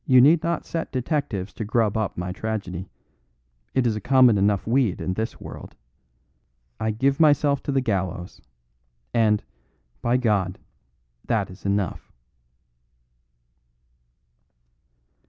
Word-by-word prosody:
You 130 -2 +7
need 155 +6 +6
not 170 -1 -2
set 165 -1 -4
detectives 125 - -2
to - - -5
grub 110 -1 +1
up 110 -2 -2
my 90 +1 -3
tragedy; 95 -3 -4 0.9
it 130 - +2
is 115 -3 +1
a 105 - -4
common 130 -1 +5
enough 100 0 +2
weed 115 -4 +1
in 90 - -2
this 110 +4 -4
world. - - -10 1.0
I 110 - 0
give 135 +6 +1
myself 145 -2 +4
to - - -3
the 135 -1 +2
gallows; 95 -6 -3 0.7
and, 110 -2 +3 0.6
by 120 +1 +2
God, 100 -7 0 0.7
that - - 0
is 95 - -8
enough!" 100 -1 -2
110 Hz, 120 wpm, -24 LUFS, 100-130 Hz, 1.0 s, You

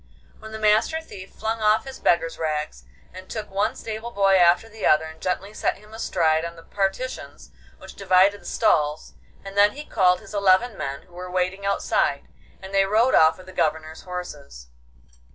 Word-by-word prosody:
Then 220 0 -10
the 220 - -6
Master 220 +9 +2
Thief 195 -12 -11
flung 220 +1 -4
off 215 +2 +3
his 265 -1 -9
beggar's 165 -1 +1
rags, 150 - -3 0.3
and 185 0 -11
took 215 -3 -6
one 200 +1 0
stable 220 +1 -6
boy 195 -4 +2
after 175 +4 +4
the 220 -1 -11
other 155 +1 +4
and 160 0 -11
gently 195 +3 -3
set - - -1
him 210 +2 -17
astride 165 -7 +1
on 170 0 -6
the 165 - -14
partitions 200 +8 -4 0.3
which - - -12
divided 195 +1 +3
the - - -20
stalls, 155 -8 0 0.3
and 195 0 -8
then 205 +1 +5
he 295 +2 -8
called 180 -6 +2
his - - -14
eleven 200 +3 +3
men 140 -4 -5
who 180 - -24
were 180 +1 -8
waiting 185 +2 -2
outside, 200 - 0 0.4
and 190 +1 -9
they 195 0 +4
rode 220 +6 +2
off 160 0 +5
with 185 - -14
the 185 - -12
Governor's 160 -2 -2
horses. 150 - -8
190 Hz, 190 wpm, -23 LUFS, 170-215 Hz, 0.4 s, then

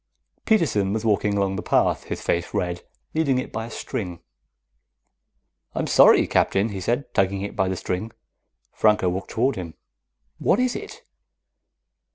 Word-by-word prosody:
Peterson 135 - +2
was 110 +1 -2
walking 105 -1 +1
along 100 -1 0
the - - -3
path, - - +1
his - - -5
face 85 +1 -1
red, 90 -1 -1 0.3
leading 150 -5 +1
it 130 - -3
by 110 +1 -4
a - - -10
string. 90 -6 -5 1.6
"I'm - - -1
sorry, - - +6
Captain," 100 +3 +1
he 100 -2 -5
said, 120 +6 -2
tugging 95 +1 +1
at 100 - -7
the 95 -2 0
string. 95 +5 -3 0.6
Franco 105 -4 +3
walked 95 +2 -4
toward 125 +1 0
him. 85 -3 -6 0.6
"What 205 - +2
is 255 -1 +1
it?" 420 0 -8
100 Hz, 150 wpm, -23 LUFS, 95-120 Hz, 1.6 s, sorry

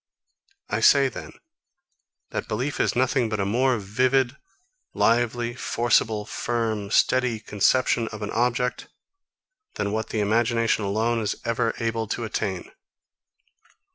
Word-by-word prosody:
I - - -1
say, - - +5
then, - - -9 1.0
that - - -4
belief 125 +7 -3
is - - +1
nothing 130 -1 +1
but 110 -1 -2
a 100 - 0
more 125 +5 +2
vivid, 125 +5 +1 0.6
lively, 120 +1 +1
forcible, 115 -3 +1
firm, 110 -3 -2
steady 125 +1 +2
conception 115 +3 +1
of 110 -1 -7
an 105 - -4
object, 125 +1 0 0.9
than 100 - -2
what 110 +1 -2
the 110 - -2
imagination 115 +1 +1
alone 110 +4 0
is 105 -2 -1
ever 115 0 0
able 115 -1 -2
to 115 - -3
attain. 95 -4 -3
115 Hz, 125 wpm, -24 LUFS, 110-120 Hz, 1.0 s, say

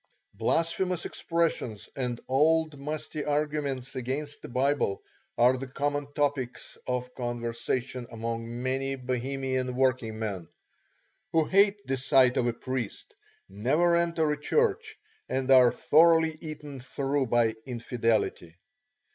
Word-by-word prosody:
Blasphemous 170 +1 0
expressions 165 -10 -1
and 125 -3 -2
old 155 +2 +2
musty 150 +1 -4
arguments 145 -3 -2
against 135 +4 -3
the - - -9
Bible 130 -4 0 0.3
are 125 +2 +5
the 130 +1 -5
common 145 +2 -2
topics 140 -4 -1
of 125 0 -2
conversation 120 +1 -3
among 115 +1 -4
many 135 +1 -1
Bohemian 130 0 -2
working 125 -4 +1
men, 100 -6 -4 0.9
who 160 -1 +4
hate 200 +2 +3
the 135 0 -1
sight 130 -1 +4
of 120 - +1
a 120 - +1
priest, 125 -2 -5 0.3
never 145 - +2
enter 170 -2 +1
a 150 - -2
church, 450 - +1 0.3
and 130 0 0
are 125 -2 +8
thoroughly 160 0 +4
eaten 150 -3 -7
through 135 +1 -1
by 115 -1 +3
infidelity. 115 -8 -1
135 Hz, 120 wpm, -28 LUFS, 120-150 Hz, 0.9 s, are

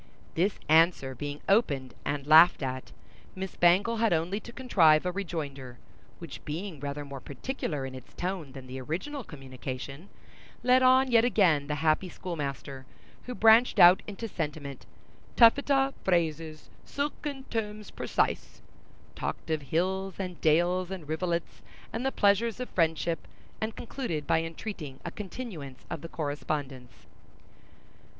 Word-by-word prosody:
This 190 +5 +1
answer 160 -4 +4
being 145 +3 -6
opened 145 - +2
and 145 -1 -2
laughed 155 +1 +7
at, 130 0 -4 0.4
Miss 190 0 -5
Bangle 190 +7 +4
had 225 -1 +2
only 170 +5 0
to 235 - -11
contrive 180 -12 +4
a 180 - 0
rejoinder, 145 -9 -5 0.4
which 165 -4 -9
being 165 +1 -5
rather 145 +1 -5
more 140 -1 -7
particular 145 - -4
in 130 - -7
its 130 -1 -12
tone 175 -7 -4
than 135 -2 -9
the 130 +1 -7
original 215 - -4
communication, 135 - -8 0.5
led 255 +1 +5
on 260 0 +5
yet 230 -1 +6
again 180 -12 +3
the 150 - -1
happy 155 +4 +2
schoolmaster, 140 -6 -6 0.4
who 250 - -4
branched 225 +2 +5
out 175 +2 +8
into 210 +2 -5
sentiment, 150 - -5 0.5
"taffeta 270 +3 +5
phrases, 160 -3 -1
silken 285 -1 -4
terms 210 -2 -4
precise," - - -2 0.5
talked - - -4
of 155 -1 0
hills 185 +7 -1
and 180 -3 -5
dales 175 +3 +2
and 185 -6 -7
rivulets, 170 +2 -2 0.3
and 230 - -3
the 270 - +1
pleasures 210 +2 +2
of 250 - -4
friendship, 165 -1 0 0.3
and 220 0 -2
concluded 195 - -4
by 160 - +2
entreating 165 -4 -6
a - - -3
continuance 185 - -8
of - - -4
the 165 - -8
correspondence. 145 -4 -4
170 Hz, 140 wpm, -29 LUFS, 145-210 Hz, 0.5 s, out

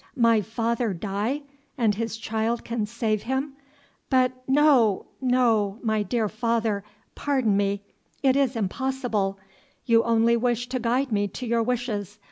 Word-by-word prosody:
"My 230 -3 +4
father 225 0 -1
die, 210 - -2 0.3
and 225 -5 +3
his 225 +2 -3
child 225 +1 -2
can 230 -3 -2
save 215 -2 -1
him! 265 +3 -2 0.6
but 255 -2 +3 0.2
no 265 -8 +4 0.2
no 230 -6 +2
my 220 -2 +1
dear 225 +1 0
father, 220 -1 -1 0.3
pardon 260 -8 +1
me, 200 0 0 0.4
it 265 -1 +4
is 275 -2 +2
impossible; 225 -2 -1 0.5
you 230 -1 +5
only 230 0 +3
wish 240 0 0
to 255 0 -2
guide 245 +3 0
me 205 -1 +1
to 250 +6 -7
your 235 0 +1
wishes. 225 -4 -2
230 Hz, 140 wpm, -25 LUFS, 215-250 Hz, 0.6 s, you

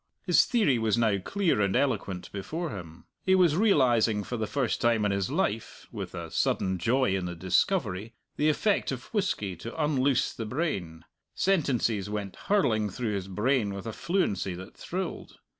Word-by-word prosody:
His - - +5
theory 205 - +2
was 110 -2 +1
now 110 -4 +2
clear 170 - 0
and 100 -1 +1
eloquent 95 -10 -1
before 155 - -4
him. 85 -4 -9 0.2
He 190 - +4
was 175 -5 +4
realizing 120 - +3
for 125 - -4
the 110 -2 -2
first 135 -2 -1
time 115 -3 +3
in 105 - +2
his 100 +1 -1
life 130 - -2
(with - - -6
a - - -6
sudden 95 -1 0
joy 120 +2 +2
in 95 -2 -2
the 90 0 -4
discovery) 100 - 0 0.2
the 150 - +2
effect 200 +4 +1
of 130 - -7
whisky 145 - -1
to 115 - -8
unloose 140 -4 +2
the 115 - -5
brain; 100 - -3 0.3
sentences 120 - +1
went 105 -2 -4
hurling 110 - +1
through 110 +2 -3
his 95 -2 -3
brain 105 +1 0
with 100 - -7
a 115 - -4
fluency 100 - -1
that 95 +2 -10
thrilled. 185 0 -5
115 Hz, 175 wpm, -28 LUFS, 100-150 Hz, 0.3 s, His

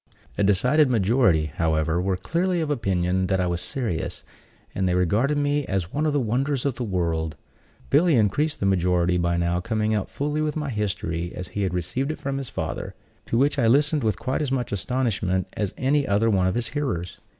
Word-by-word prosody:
A - - -1
decided 125 +9 +3
majority, 95 - +2
however, 80 +1 +1
were 95 0 0
clearly 175 - 0
of 155 -2 -1
opinion 95 -6 0
that 95 0 +1
I 90 - +1
was 85 0 -1
serious; 110 -12 -3 0.5
and 95 -1 0
they 90 - +1
regarded 105 - +2
me 145 0 +1
as 95 -3 -2
one 155 +2 +1
of - - +2
the 145 - +2
wonders 130 +3 0
of 140 - +1
the 125 - -4
world. 85 -6 -1 0.6
Billy 165 -1 +4
increased 125 +8 +1
the - - -1
majority 90 -2 +2
by 85 0 +1
now 85 +1 +1
coming 110 +2 -1
out 105 -3 -1
fully 150 +2 -2
with 150 -1 -1
my 150 -3 -2
history, 95 -6 -2
as 90 0 -6
he 105 - -4
had 95 -2 -1
received 90 - -2
it - - -7
from 135 0 -3
his 135 - -6
father; - - -4 0.3
to 115 - 0
which 140 +3 +2
I 115 - +3
listened 145 +4 +3
with 110 -4 +1
quite 130 +3 -2
as 145 -3 -1
much 125 -3 -1
astonishment 100 -4 -1
as 105 -3 -2
any 140 +1 +1
other 110 +3 +2
one 95 -2 +2
of 95 - 0
his 120 -1 -1
hearers. 130 - -3
105 Hz, 205 wpm, -24 LUFS, 90-140 Hz, 0.6 s, Billy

